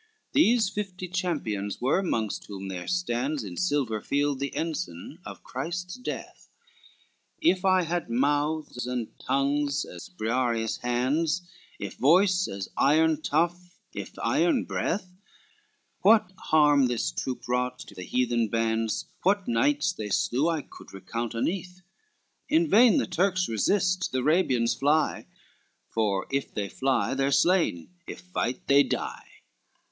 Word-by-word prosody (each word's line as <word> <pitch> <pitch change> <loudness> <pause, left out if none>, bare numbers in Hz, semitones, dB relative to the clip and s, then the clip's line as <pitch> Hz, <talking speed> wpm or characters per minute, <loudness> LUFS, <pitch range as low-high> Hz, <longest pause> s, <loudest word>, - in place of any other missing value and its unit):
XCII 440 0 -40
These 230 -7 +4
fifty 190 -3 -5
champions 145 - -2
were, 135 +9 +2
mongst 110 - -2
whom 95 -1 -7
there 90 -2 -6
stands, 145 -6 -1
In 95 -4 -7
silver 140 -11 0
field, 145 -1 0
the 140 0 -2
ensign 150 - -4
of - - -10
Christ's 180 +2 -4
death, 250 - -7 0.9
If 190 - +2
I 185 -1 +4
had 170 -2 -2
mouths 145 +1 0
and 125 -3 -3
tongues 140 +1 0
as 85 - -10
Briareus 115 +2 -1
hands, 145 +8 0 0.4
If - - -6
voice 180 +5 +4
as 95 -1 -5
iron 155 +2 +3
tough, 175 +4 -1 0.2
if - - -7
iron 290 -8 +2
breath, 185 -1 -2 0.9
What 210 -3 +5
harm 145 -3 +5
this 115 - -1
troop 125 - -4
wrought 125 +1 0
to - - -11
the 90 - -9
heathen 120 +3 0
bands, 115 -1 0 0.2
What 195 +1 +2
knights 280 -5 +2
they 105 -10 -5
slew, 130 - +1
I 160 -4 -1
could - - -14
recount 115 +4 -4
uneath 180 +8 -3 0.7
In 325 +2 +3
vain 230 - +6
the - - +2
Turks 185 0 +1
resist, 185 - +1
the 130 - -1
Arabians 130 -6 +2
fly; 150 +3 +1 0.7
If 110 +5 -1
they 100 -2 -2
fly, 135 -1 0
they 135 0 0
are 140 - +1
slain; 170 - +2 0.2
if - - -7
fight, 150 -9 -3
they 140 +1 +6
die. - - -3
145 Hz, 140 wpm, -27 LUFS, 120-180 Hz, 0.9 s, vain